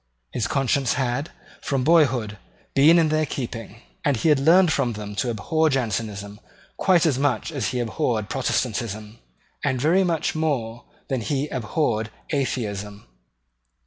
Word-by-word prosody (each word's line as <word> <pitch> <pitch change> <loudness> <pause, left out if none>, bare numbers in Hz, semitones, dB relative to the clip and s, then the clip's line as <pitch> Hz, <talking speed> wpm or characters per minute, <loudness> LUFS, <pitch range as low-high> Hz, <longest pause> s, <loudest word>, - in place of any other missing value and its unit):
His 110 -2 -1
conscience 135 0 +1
had, 130 +3 -1 0.3
from 135 -4 -1
boyhood, 130 -9 +3 0.3
been 155 +5 +6
in 165 -2 +3
their 155 0 +1
keeping; 115 -3 -6 0.2
and 140 -4 +2
he 160 - +1
had 150 -3 +4
learned 165 +3 +5
from 125 -4 0
them 105 -1 -7
to 125 - 0
abhor 155 +8 +1
Jansenism 105 -5 -3 0.4
quite 180 -4 +3
as 140 -5 +2
much 140 -1 0
as 135 -9 -2
he 125 - -2
abhorred 115 -3 -1
Protestantism, 110 -4 -2 0.4
and 130 - 0
very 165 +8 +3
much 170 -4 0
more 125 -8 -2 0.2
than 130 -3 -1
he 140 +5 -1
abhorred 115 -3 -1 0.2
Atheism. 105 -8 -3
130 Hz, 145 wpm, -23 LUFS, 110-150 Hz, 0.4 s, been